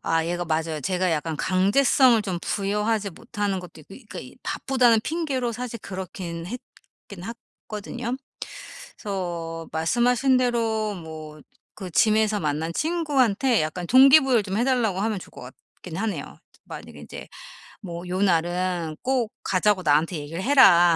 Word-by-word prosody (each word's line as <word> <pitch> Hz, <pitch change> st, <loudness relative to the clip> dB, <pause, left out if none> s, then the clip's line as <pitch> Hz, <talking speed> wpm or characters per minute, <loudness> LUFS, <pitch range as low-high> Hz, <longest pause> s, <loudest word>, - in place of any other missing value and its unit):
아 165 Hz, 0 st, +1 dB
얘가 175 Hz, +1 st, -2 dB
맞아요. 160 Hz, -1 st, -1 dB
제가 185 Hz, +3 st, 0 dB
약간 160 Hz, 0 st, -1 dB
강제성을 225 Hz, -, +4 dB
좀 185 Hz, -4 st, -3 dB
부여하지 210 Hz, +1 st, -1 dB
못하는 205 Hz, -1 st, -3 dB
것도 170 Hz, -3 st, -12 dB
있고 -, -, -26 dB
그니까 240 Hz, -5 st, -10 dB
이 -, -, -10 dB
바쁘다는 245 Hz, -4 st, +2 dB
핑계로 275 Hz, -7 st, -2 dB
사실 240 Hz, 0 st, -5 dB
그렇긴 180 Hz, -3 st, -6 dB
했긴 200 Hz, -4 st, -11 dB, 0.4 s
했거든요. 235 Hz, +4 st, -4 dB, 0.8 s
그래서 170 Hz, -5 st, -4 dB
말씀하신 245 Hz, -, +2 dB
대로 225 Hz, -4 st, 0 dB
뭐 155 Hz, -2 st, -9 dB, 0.3 s
그 190 Hz, -3 st, -7 dB
짐에서 215 Hz, +2 st, +3 dB
만난 155 Hz, +2 st, -1 dB
친구한테 270 Hz, -, +2 dB
약간 170 Hz, +3 st, -3 dB
동기부여를 265 Hz, -3 st, +6 dB
좀 195 Hz, +1 st, -3 dB
해 235 Hz, -, +2 dB
달라고 230 Hz, -8 st, +1 dB
하면 215 Hz, 0 st, 0 dB
좋을 -, -, -13 dB
것 -, -, -12 dB, 0.4 s
같긴 170 Hz, -3 st, -8 dB
하네요. 215 Hz, +1 st, -4 dB, 0.3 s
만약에 -, -, -10 dB
인제 -, -, -9 dB, 0.5 s
뭐 175 Hz, -2 st, -7 dB
"요 185 Hz, +1 st, -2 dB
날은 175 Hz, -2 st, 0 dB
꼭 255 Hz, -4 st, 0 dB
가자고 190 Hz, +1 st, +2 dB
나한테 155 Hz, +4 st, +2 dB
얘기를 155 Hz, +4 st, -5 dB
해라." 190 Hz, -10 st, +6 dB
200 Hz, 320 characters per minute, -24 LUFS, 170-240 Hz, 0.8 s, 동기부여를